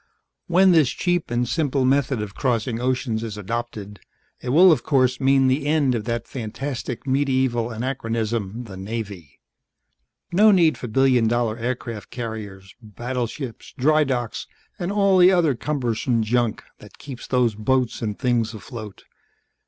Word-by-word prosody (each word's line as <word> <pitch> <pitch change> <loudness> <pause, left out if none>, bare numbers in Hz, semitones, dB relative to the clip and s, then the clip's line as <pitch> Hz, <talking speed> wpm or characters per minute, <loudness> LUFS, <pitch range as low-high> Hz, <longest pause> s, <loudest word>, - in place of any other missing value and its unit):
"When 185 +2 +5
this 155 -7 +4
cheap 175 +4 -1
and 120 +1 0
simple 135 +1 0
method 135 -3 +1
of 100 -2 -8
crossing 120 -1 -1
oceans 125 -3 -1
is 110 -2 -5
adopted, 105 -1 -5 0.4
it 125 - -5
will 175 +7 +7
of 145 -7 +2
course 130 -3 +2
mean 135 0 +3
the 135 +3 +1
end 145 -4 +2
of 115 -3 -3
that 115 -1 -3
fantastic 125 +1 -5
medieval 130 -3 +1
anachronism, 115 -2 -3
the 100 -5 -10
Navy. 100 - -7 0.9
No 210 +5 +5
need 170 -7 +4
for 120 - -7
billion 125 0 +3
dollar 120 -1 0
aircraft 115 -3 -5
carriers, 105 -5 -7
battleships, 120 +3 -5
drydocks 135 -4 +1 0.3
and 175 +2 -2
all 200 -2 +3
the 180 +1 +7
other 170 -6 +3
cumbersome 120 -3 -1
junk 120 0 0 0.2
that - - -15
keeps 135 -4 -9
those 125 -3 +2
boats 125 +3 0
and 105 -3 -3
things 120 -3 0
afloat. 110 -2 -9
125 Hz, 145 wpm, -23 LUFS, 115-135 Hz, 0.9 s, will